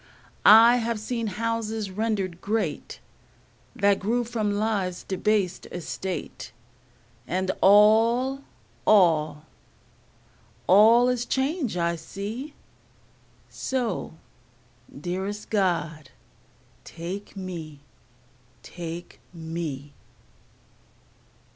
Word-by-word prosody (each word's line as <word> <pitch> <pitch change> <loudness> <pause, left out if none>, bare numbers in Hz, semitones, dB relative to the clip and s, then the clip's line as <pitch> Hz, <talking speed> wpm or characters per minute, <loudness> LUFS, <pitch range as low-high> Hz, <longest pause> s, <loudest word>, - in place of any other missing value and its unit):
I 230 +3 +8
have 230 -2 -2
seen 230 +1 -3
houses 220 0 -3
rendered 195 -4 -2
great 220 +2 -3 0.8
That 200 0 +2
grew 235 +5 0
from 225 -3 -2
life's 205 -4 -1
debased 195 -1 -1
estate, 180 0 -6 0.8
And 185 +1 -1
all, 225 +7 +4 0.4
all, 160 -7 +3 1.2
all 225 +6 +6
is 250 -1 0
change 265 - -1
I 170 0 0
see, 220 - -7 0.9
So, 255 -9 -3 0.9
dearest 190 +6 -4
God, 165 -7 -1 0.7
take 185 +5 -7
me, 165 -6 -7 0.8
take 170 0 -8
me. 160 -4 -6
200 Hz, 75 wpm, -25 LUFS, 175-225 Hz, 1.2 s, I